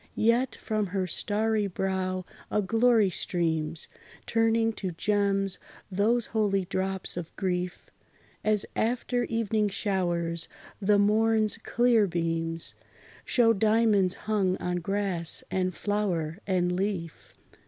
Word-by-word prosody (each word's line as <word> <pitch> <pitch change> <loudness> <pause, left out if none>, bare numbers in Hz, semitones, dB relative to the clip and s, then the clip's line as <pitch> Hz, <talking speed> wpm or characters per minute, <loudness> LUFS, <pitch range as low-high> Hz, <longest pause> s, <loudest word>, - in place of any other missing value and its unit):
Yet 235 +3 +2
from 215 -2 -2
her 190 0 -1
starry 210 +3 0
brow 185 -1 -2 0.2
a - - +1
glory 225 -1 +3
streams, 160 -3 -1 0.4
Turning 225 0 +2
to 190 -3 -4
gems 195 +1 0 0.3
those 215 +5 +2
holy 200 -4 0
drops 190 0 -1
of 170 -2 -6
grief, 180 -1 -2 0.6
As 215 -1 +3
after 245 +1 0
evening 220 -2 0
showers, 175 -5 -1 0.3
the 205 +1 +4
morn's 215 +1 +3
clear 235 -2 +3
beams 165 -1 -2 0.5
Show 230 -3 +4
diamonds 215 -3 +3
hung 200 -4 0
on 180 0 -2
grass, 185 -2 0
and 185 -1 0
flower 180 -5 -2
and 180 -2 +1
leaf. 185 -4 -4
195 Hz, 110 wpm, -28 LUFS, 180-220 Hz, 0.6 s, the